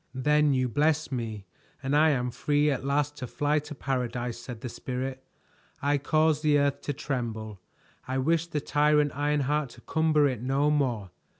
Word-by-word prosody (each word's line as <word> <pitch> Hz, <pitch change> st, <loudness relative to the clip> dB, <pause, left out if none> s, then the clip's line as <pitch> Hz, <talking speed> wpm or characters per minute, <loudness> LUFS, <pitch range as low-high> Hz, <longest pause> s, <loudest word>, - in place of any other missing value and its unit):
"Then 150 Hz, +3 st, +3 dB
you 130 Hz, -1 st, +1 dB
bless 150 Hz, +4 st, +1 dB
me 110 Hz, -5 st, -4 dB, 0.4 s
and 135 Hz, +2 st, 0 dB
I 155 Hz, +2 st, +5 dB
am 125 Hz, -4 st, 0 dB
free 145 Hz, +4 st, +1 dB
at 135 Hz, -2 st, -2 dB
last 145 Hz, +1 st, 0 dB
to 130 Hz, -, -5 dB
fly 145 Hz, +4 st, +1 dB
to 150 Hz, +1 st, -9 dB
paradise," 125 Hz, -3 st, -2 dB
said 120 Hz, -2 st, -8 dB
the -, -, -4 dB
Spirit. 130 Hz, +2 st, -5 dB, 0.6 s
"I 145 Hz, +1 st, +1 dB
caused 155 Hz, +1 st, +2 dB
the 150 Hz, -2 st, +4 dB
earth 140 Hz, -1 st, +1 dB
to 145 Hz, -, -3 dB
tremble. 110 Hz, -7 st, -4 dB, 0.5 s
I 130 Hz, +1 st, -1 dB
wished 165 Hz, +5 st, +1 dB
the 150 Hz, -, -1 dB
tyrant 150 Hz, 0 st, +2 dB
Ironheart 145 Hz, 0 st, 0 dB
to -, -, -14 dB
cumber 155 Hz, -1 st, +2 dB
it 125 Hz, -5 st, -3 dB
no 135 Hz, +4 st, +1 dB
more. 120 Hz, -10 st, 0 dB
140 Hz, 175 wpm, -28 LUFS, 125-150 Hz, 0.6 s, I